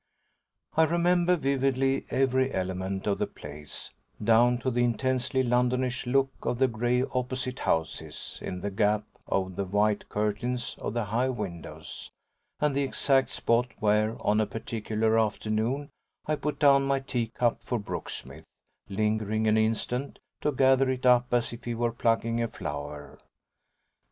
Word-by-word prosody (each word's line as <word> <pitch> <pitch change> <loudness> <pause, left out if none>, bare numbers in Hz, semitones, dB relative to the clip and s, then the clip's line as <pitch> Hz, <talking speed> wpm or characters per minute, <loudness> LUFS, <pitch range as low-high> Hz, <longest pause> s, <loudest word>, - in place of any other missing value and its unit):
I 160 - +6
remember 175 +2 +3
vividly 135 -2 +1
every 130 0 +2
element 95 +1 -2
of 100 -1 0
the - - 0
place, 75 0 -9 0.3
down 120 +2 +5
to 130 - 0
the 120 0 +2
intensely 130 +2 +1
Londonish 125 +1 +1
look 135 +1 +2
of 120 - -1
the 130 +1 +4
grey 120 +2 +1
opposite 130 0 -2
houses, 80 -2 -2
in 90 -1 -5
the 100 - -3
gap 105 +1 +2 0.2
of 95 -1 -1
the 100 - 0
white 105 +2 +1
curtains 105 +4 -1
of 105 - -3
the 120 - +1
high 120 +6 +1
windows, 100 -9 -6 0.5
and 150 -2 +1
the 140 - +2
exact 135 0 +2
spot 120 +2 +1
where, 110 +1 +2
on 105 +1 +3
a 110 - 0
particular 110 +1 0
afternoon, 110 +6 -1 0.3
I 155 - +1
put 150 0 -3
down 140 -2 +6
my 135 0 +2
tea 125 -4 -2
cup 120 +1 0
for 120 - -2
Brooksmith, 105 - -6 0.4
lingering 110 +1 0
an 110 - +4
instant, 115 +5 0 0.2
to 150 - +1
gather 135 0 +4
it 130 -1 -2
up 125 -1 +5
as 120 -1 +1
if 120 - -10
he 120 -1 -2
were 120 0 0
plucking 115 0 +1
a 115 - +1
flower. 75 -7 -6
120 Hz, 150 wpm, -28 LUFS, 105-130 Hz, 0.5 s, I